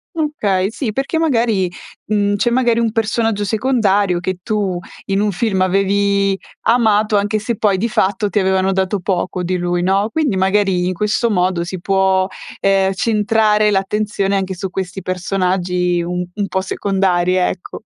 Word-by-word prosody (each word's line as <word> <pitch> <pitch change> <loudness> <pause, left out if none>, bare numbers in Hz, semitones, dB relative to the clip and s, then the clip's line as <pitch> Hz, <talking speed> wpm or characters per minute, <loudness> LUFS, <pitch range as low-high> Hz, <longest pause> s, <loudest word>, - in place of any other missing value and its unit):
Okay 210 - 0
sì, 230 -1 -3
perché 275 +8 -2
magari, 230 - +1 0.3
mhmm, 205 -1 +1
c'è 240 +4 +1
magari 240 -1 +2
un 230 -1 +1
personaggio 225 -1 0
secondario 205 -5 +1
che 185 +1 -3
tu 200 -3 -1 0.3
in 195 +1 0
un 210 -1 +1
film 190 0 -1
avevi 195 +1 +2 0.3
amato 220 -2 +3
anche 205 +1 +1
se 225 +2 -2
poi, 200 -3 +2
di 225 +5 0
fatto, 200 -1 0
ti 205 - +1
avevano 190 0 +1
dato 190 +1 0
poco 180 0 -2
di 180 +1 -1
lui, 175 0 -1
no, 195 +3 +1
quindi 295 -10 0
magari 190 -1 +1
in 185 - -1
questo 210 +5 0
modo 180 -3 +1
si 185 +1 -6
può, 190 0 +2 0.3
ehm, 195 -1 +2
centrare 215 0 +2
l'attenzione 200 0 0
anche 190 -1 -2
su 190 +1 -4
questi 190 0 -5
personaggi 180 -1 -1
un 175 +1 -3 0.2
un 205 -1 -2
po' 190 - -1
secondari, 190 -2 0
ecco. 180 - -2
195 Hz, 160 wpm, -17 LUFS, 185-215 Hz, 0.3 s, amato